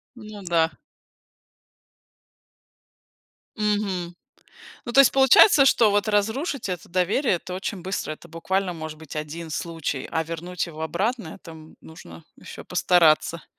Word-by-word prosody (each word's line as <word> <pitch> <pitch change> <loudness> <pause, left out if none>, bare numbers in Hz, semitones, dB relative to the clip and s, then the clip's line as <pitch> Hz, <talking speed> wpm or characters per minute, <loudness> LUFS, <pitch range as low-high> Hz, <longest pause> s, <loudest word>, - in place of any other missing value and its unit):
Ну 215 -3 -11
да. 165 -2 +1 2.8
Мгм. 205 -5 -2 0.7
Ну, 240 - -4
то 275 - +4
есть 275 - +4
получается, 270 - +6
что 230 -5 +4
вот 205 +1 +1
разрушить 220 - -1
это 180 -3 -6
доверие- 185 +9 +1
это 180 +1 -7
очень 190 0 -5
быстро, 185 -4 -3
это 165 - -15
буквально 180 +3 -2
может 155 -1 -7
быть 160 -2 -11
1 155 +2 -6
случай, 160 -4 -4
а 160 - 0
вернуть 170 +2 -5
его 160 -2 -9
обратно- 185 +3 -2
это 165 - -11 0.3
нужно 85 - -13
еще - - -11
постараться. 170 -1 +2
180 Hz, 130 wpm, -24 LUFS, 160-210 Hz, 2.8 s, получается